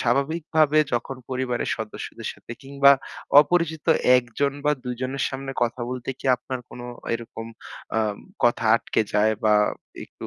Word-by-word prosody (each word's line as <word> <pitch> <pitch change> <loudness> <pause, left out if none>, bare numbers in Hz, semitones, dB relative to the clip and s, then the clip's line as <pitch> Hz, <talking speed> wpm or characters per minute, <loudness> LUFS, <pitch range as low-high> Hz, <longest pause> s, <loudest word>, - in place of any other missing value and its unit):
স্বাভাবিকভাবে 155 +4 +2
যখন 120 +3 -2
পরিবারের 130 -1 -2
সদস্যদের 110 -2 -6
সাথে - - -11
কিংবা 140 0 +5 0.5
অপরিচিত 160 0 0 0.3
১জন 125 +3 -1
বা 150 - +4
২জনের 130 +2 -3
সামনে 135 0 -5
কথা 120 +1 -1
বলতে 125 0 -6
কি - - -7
আপনার 130 +1 -6
কোনো 120 - -9 0.3
এরকম 115 -1 -7 0.5
আ - - +4 0.5
কথা 120 -1 +2
আটকে - - -1
যায় 110 +1 +3
বা 105 -1 +5 0.5
একটু - - -10
130 Hz, 135 wpm, -24 LUFS, 120-140 Hz, 0.5 s, কিংবা